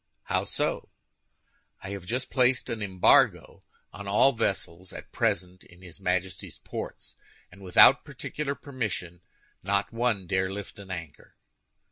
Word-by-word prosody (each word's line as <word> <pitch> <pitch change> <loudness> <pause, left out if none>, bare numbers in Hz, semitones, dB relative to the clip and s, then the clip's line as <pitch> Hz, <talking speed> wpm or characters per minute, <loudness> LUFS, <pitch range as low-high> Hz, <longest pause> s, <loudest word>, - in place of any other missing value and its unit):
"How - - -1
so?" - - -1 0.9
"I 95 - -6
have 100 -3 -7
just 125 +5 -2
placed 125 -1 +2
an 115 -2 -4
embargo 95 -3 +3 0.3
on 100 +1 -8
all 105 +7 +5
vessels 95 -5 -2
at - - -10
present 90 +1 -1
in 90 +1 -18
his 85 -2 -11
Majesty's 95 0 -2
ports, - - -7 0.4
and 100 +2 -15
without 90 -2 +7
particular 145 -2 -4
permission, 105 -12 -4 0.4
not 100 +2 0
one 115 -5 0
dare 95 +1 0
lift 100 +1 -7
an 100 -1 -11
anchor." 80 -5 -8
100 Hz, 135 wpm, -27 LUFS, 90-115 Hz, 0.9 s, without